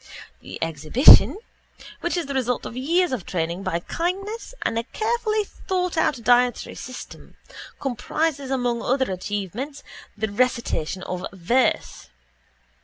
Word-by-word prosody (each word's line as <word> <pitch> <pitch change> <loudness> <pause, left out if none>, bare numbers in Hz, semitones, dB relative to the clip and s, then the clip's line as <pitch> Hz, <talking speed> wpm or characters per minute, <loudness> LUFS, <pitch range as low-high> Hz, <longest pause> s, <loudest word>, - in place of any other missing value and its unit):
The - - -9
exhibition, 165 - +6 0.6
which 345 +1 -1
is 345 - -1
the 280 - -4
result 250 -2 -1
of - - -6
years 335 +7 +1
of 245 -8 -2
training 170 +1 -2
by 185 -3 -2
kindness 390 - -3
and 230 - 0
a - - -2
carefully 435 - 0
thoughtout 360 - -1
dietary 245 0 +3
system, 255 0 -10 0.4
comprises, 280 +2 -2
among 245 -3 0
other 260 -4 +1
achievements, 205 - -4 0.3
the 215 0 -2
recitation 205 -7 0
of 180 0 -4
verse. 195 - 0
255 Hz, 120 wpm, -23 LUFS, 205-325 Hz, 0.6 s, exhibition